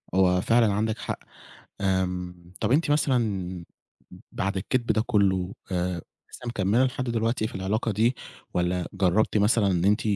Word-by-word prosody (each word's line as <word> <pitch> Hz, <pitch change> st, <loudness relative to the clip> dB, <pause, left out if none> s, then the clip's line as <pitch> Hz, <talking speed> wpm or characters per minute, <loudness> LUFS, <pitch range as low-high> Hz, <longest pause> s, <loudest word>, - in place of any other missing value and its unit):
هو 90 Hz, -1 st, +4 dB
فعلًا 115 Hz, 0 st, +3 dB
عندِك 110 Hz, +2 st, 0 dB
حق، -, -, -4 dB, 0.6 s
آمم، 90 Hz, -2 st, -2 dB
طب 110 Hz, -, +1 dB
أنتِ 150 Hz, +2 st, +3 dB
مثلًا 105 Hz, -, 0 dB, 0.7 s
بعد 95 Hz, 0 st, -2 dB
الكدب 120 Hz, +6 st, -1 dB
ده 110 Hz, -, +2 dB
كله، 95 Hz, -4 st, +2 dB, 0.2 s
آآ، 90 Hz, -1 st, -1 dB, 0.3 s
لسه 125 Hz, -, -9 dB
مكملِه 115 Hz, +2 st, +2 dB
لحد 130 Hz, 0 st, -2 dB
دلوقتي 115 Hz, -1 st, 0 dB
في -, -, -10 dB
العلاقة 100 Hz, +4 st, -1 dB
دي، 115 Hz, +5 st, +2 dB, 0.4 s
والّا 90 Hz, 0 st, 0 dB
جربتِ 100 Hz, +4 st, +2 dB
مثلًا 105 Hz, 0 st, +3 dB
إن 90 Hz, -2 st, +1 dB
أنتِ 105 Hz, +1 st, +3 dB
100 Hz, 150 wpm, -26 LUFS, 90-115 Hz, 0.7 s, هو